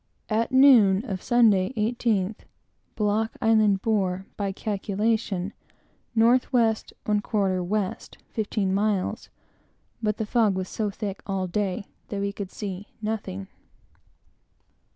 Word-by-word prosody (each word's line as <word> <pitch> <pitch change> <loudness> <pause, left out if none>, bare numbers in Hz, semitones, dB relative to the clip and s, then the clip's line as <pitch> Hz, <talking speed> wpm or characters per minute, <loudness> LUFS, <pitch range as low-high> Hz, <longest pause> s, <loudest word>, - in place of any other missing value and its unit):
At 225 +2 +1
noon 245 -6 +6
of 190 -6 -4
Sunday, 225 -3 +3
18th, 215 -2 0 0.6
Block 215 +1 0
Island 215 -3 +3
bore, 190 -4 0
by 200 -2 -2
calculation, 205 -1 -1 0.6
N. - - +5
W. 240 +3 +6
1/4 210 -5 0
W. 205 -2 0 0.4
fifteen 210 -3 -1
miles; 200 -1 0 0.7
but 210 -1 0
the 220 - -2
fog 215 -3 +2
was 185 0 -3
so 215 -2 -2
thick 200 -1 -5
all 195 -2 -1
day 195 +2 -2 0.2
that 200 - -4
we 200 0 -2
could 200 -2 -6
see 200 -1 -6
nothing. 210 - -4
210 Hz, 115 wpm, -25 LUFS, 195-220 Hz, 0.7 s, noon